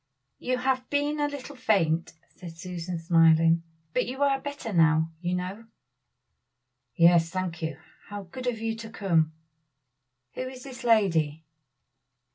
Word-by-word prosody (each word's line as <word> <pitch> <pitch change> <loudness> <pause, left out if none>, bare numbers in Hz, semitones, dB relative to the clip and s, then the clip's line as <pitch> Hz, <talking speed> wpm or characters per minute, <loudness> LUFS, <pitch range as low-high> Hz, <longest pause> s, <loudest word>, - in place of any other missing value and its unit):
"You 255 0 -1
have 255 0 -1
been 290 +1 0
a 290 - +2
little 285 0 -7
faint," 185 -10 +1 0.2
said 165 -2 -10
Susan 175 0 -5
smiling, 165 0 +4 0.3
"but 250 - +1
you 265 +3 -2
are 275 -1 +2
better 285 -6 -5
now, 160 -1 +4
you 180 0 -1
know!" 190 +5 -5 1.3
"Yes, 170 -1 +5
thank 180 -2 -3
you! 160 0 -3 0.3
how 205 -1 -6
good 250 +8 -7
of 245 -2 0
you 225 0 -2
to 225 0 -8
come! 165 -7 +1 1.0
Who - - -5
is 255 -1 -10
this 260 -2 -9
lady?" 165 -10 +2
190 Hz, 140 wpm, -27 LUFS, 165-250 Hz, 1.3 s, Yes